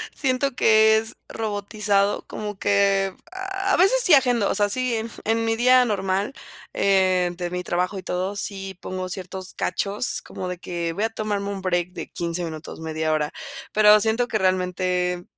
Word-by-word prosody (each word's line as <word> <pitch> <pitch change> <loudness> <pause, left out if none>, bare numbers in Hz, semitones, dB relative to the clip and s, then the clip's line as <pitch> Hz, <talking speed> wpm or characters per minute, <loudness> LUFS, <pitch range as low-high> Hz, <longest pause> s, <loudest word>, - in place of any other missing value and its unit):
siento 270 -1 0
que 220 -1 +5
es 220 0 -3
robotizado, 205 -1 -1
como 210 -2 -6
que 200 -1 +2 0.2
a 380 +1 -6 0.2
a - - +4
veces 390 +8 +4
sí 360 - +5
agendo. 245 -6 +2
O - - 0
sea, 205 -1 +2
sí, 255 +2 0 0.3
en 225 +1 0
mi 225 0 +1
día 250 +2 +5
normal, 195 +1 -1 0.4
eh, 185 -2 +2
de 175 -1 -3
mi 180 0 -3
trabajo 180 +3 -1
y - - -10
todo, 185 +3 -2
sí 195 -1 -4
pongo 185 0 -4
ciertos 185 0 -6
cachos, 200 +6 -2
como 185 - -6
de 180 0 -4
que 170 -1 -4
voy 205 - -2
a 225 - +1
tomarme 210 -2 -3
un 200 -1 -5
break 175 -1 0
de - - -7
15 170 +1 -3
minutos, 160 -2 -7
media 160 -1 -2
hora. 150 -1 -1 0.4
Pero 210 0 +6
siento 225 +3 +1
que 220 - 0
realmente, 180 -1 0
200 Hz, 175 wpm, -23 LUFS, 180-220 Hz, 0.4 s, Pero